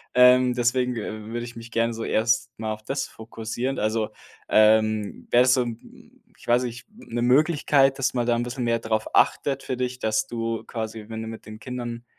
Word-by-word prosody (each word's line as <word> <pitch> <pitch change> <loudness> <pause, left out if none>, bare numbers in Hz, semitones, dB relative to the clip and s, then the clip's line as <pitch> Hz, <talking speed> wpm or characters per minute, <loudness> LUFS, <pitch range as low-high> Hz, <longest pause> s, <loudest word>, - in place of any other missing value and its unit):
Ähm, 125 0 +6
deswegen, 125 +1 +1
äh, 110 -1 -5
würde 120 0 -3
ich 120 0 -9
mich 115 0 -10
gerne 115 +1 +1
so 115 - -5
erst 110 0 +1
mal 110 0 -3
auf 110 - -11
das 135 +4 -2
fokussieren. 115 +4 -5
Also, 110 0 0 0.4
ähm, 110 -1 +3
wäre 120 - +6
das 125 0 +5
so 125 - +2
'n 115 -1 -11 0.2
ich - - -17
weiß 120 +1 +3
nicht, 120 0 -7
'n 215 - -12
'ne 120 - 0
Möglichkeit, 140 0 +3
dass 130 -1 0
man 120 -2 -1
da 120 - +3
'n 120 - -1
bisschen 120 +1 -4
mehr 115 -1 +2
darauf 110 -1 -2
achtet 135 -1 +2
für 130 - -3
dich, 125 0 -2
dass 110 0 0
du 115 -1 -3
quasi, 110 -1 -5
wenn 110 0 -5
du - - -6
mit 115 -1 -9
den 110 0 -9
Kindern, 120 -2 -6
120 Hz, 210 wpm, -25 LUFS, 110-125 Hz, 0.4 s, Ähm